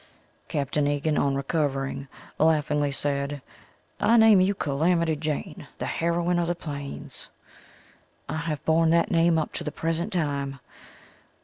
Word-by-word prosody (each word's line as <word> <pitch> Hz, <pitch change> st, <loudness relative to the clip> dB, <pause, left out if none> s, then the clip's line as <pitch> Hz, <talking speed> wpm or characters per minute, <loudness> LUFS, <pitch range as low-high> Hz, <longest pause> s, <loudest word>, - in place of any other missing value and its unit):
Capt. 140 Hz, -2 st, -3 dB
Egan 145 Hz, +1 st, +1 dB
on 140 Hz, -1 st, +1 dB
recovering, 140 Hz, -1 st, -2 dB, 0.3 s
laughingly 150 Hz, -2 st, +2 dB
said: 140 Hz, 0 st, -2 dB, 0.6 s
"I 235 Hz, -, +4 dB
name 220 Hz, -4 st, +7 dB
you 195 Hz, +2 st, +2 dB
Calamity 160 Hz, +2 st, +1 dB
Jane, 150 Hz, 0 st, -4 dB
the -, -, -4 dB
heroine 170 Hz, +1 st, 0 dB
of 170 Hz, -, 0 dB
the 175 Hz, -, 0 dB
plains." 145 Hz, -4 st, -7 dB, 1.0 s
I -, -, -3 dB
have 155 Hz, -2 st, -4 dB
borne 160 Hz, 0 st, +3 dB
that 170 Hz, +5 st, +3 dB
name 165 Hz, -1 st, +4 dB
up 155 Hz, -, -2 dB
to -, -, -4 dB
the 150 Hz, -, -3 dB
present 165 Hz, +6 st, -2 dB
time. 140 Hz, -5 st, -2 dB
155 Hz, 135 wpm, -26 LUFS, 145-170 Hz, 1.0 s, name